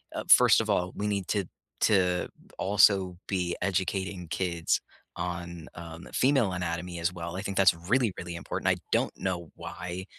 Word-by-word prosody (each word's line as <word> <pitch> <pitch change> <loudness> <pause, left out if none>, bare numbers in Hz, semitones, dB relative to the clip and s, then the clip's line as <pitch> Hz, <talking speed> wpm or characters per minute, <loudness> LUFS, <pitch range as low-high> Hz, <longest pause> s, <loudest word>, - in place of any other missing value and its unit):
uh, - - -3
first - - +8
of - - -4
all, 90 0 +1
we 105 - -3
need 100 -3 -1
to 100 -3 0 0.4
to 90 -4 +3 0.3
also 95 -2 +4
be 90 -3 -1
educating 95 -1 -1
kids 85 -1 0 0.4
on, 85 -1 -5
um, 85 0 -9
the - - -14
female 130 -6 +3
anatomy 90 0 -3
as 85 +2 0
well. 85 0 -6
I 95 - -3
think 100 -1 -4
that's 95 -2 +6
really, 100 +7 +1
really 85 0 -6
important, 85 - -2
I - - +2
don't - - +2
know 85 -3 -3
why 90 +1 -6
90 Hz, 170 wpm, -28 LUFS, 85-95 Hz, 0.4 s, first